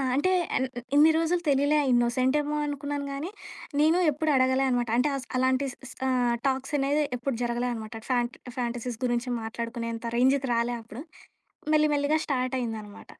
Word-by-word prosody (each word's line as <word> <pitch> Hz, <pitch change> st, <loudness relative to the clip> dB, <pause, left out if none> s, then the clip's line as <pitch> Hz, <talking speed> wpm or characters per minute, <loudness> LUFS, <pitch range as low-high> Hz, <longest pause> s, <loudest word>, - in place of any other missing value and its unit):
అంటే, 370 Hz, +7 st, +2 dB, 0.3 s
ఎన్ 260 Hz, -, +1 dB
న్ -, -, -7 dB, 0.3 s
ఇన్ని 310 Hz, +2 st, +7 dB
రోజులు 335 Hz, +2 st, +1 dB
తెలియలే. 285 Hz, +2 st, +3 dB
ఇన్నోసెంటేమో 255 Hz, +5 st, +2 dB
అనుకున్నాను 285 Hz, 0 st, -3 dB
గానీ, 285 Hz, +6 st, -4 dB, 0.5 s
నేను 315 Hz, +3 st, +4 dB
ఎప్పుడు 310 Hz, +3 st, -1 dB
అడగలే 260 Hz, +1 st, +3 dB
అనమాట. 245 Hz, -2 st, 0 dB
అంటే, 260 Hz, +4 st, +3 dB
అస్ 260 Hz, -, -8 dB
అలాంటి 260 Hz, +2 st, +2 dB
స్ -, -, -20 dB
స్ -, -, -10 dB
ఆహ్, 250 Hz, -2 st, +2 dB
టాక్సనేది 275 Hz, +2 st, 0 dB
ఎప్పుడు 260 Hz, +1 st, -2 dB
జరగలే 240 Hz, +1 st, -1 dB
అనమాట. 220 Hz, 0 st, -7 dB
ఫ్యాంట్ 240 Hz, -1 st, 0 dB, 0.2 s
ఫ్యాంటసీస్ 240 Hz, -1 st, -3 dB
గురించి 240 Hz, +1 st, -1 dB
మాట్లాడుకునేంత 230 Hz, +1 st, -4 dB
రేంజుకి 265 Hz, +1 st, +3 dB
రాలే 235 Hz, +1 st, 0 dB
అప్పుడు. 225 Hz, +3 st, -9 dB, 0.7 s
మెల్లి, 305 Hz, 0 st, +4 dB
మెల్లిగా 290 Hz, +2 st, +2 dB
స్టార్టయిందనమాట. 245 Hz, -6 st, -3 dB
260 Hz, 150 wpm, -27 LUFS, 240-285 Hz, 0.7 s, ఇన్ని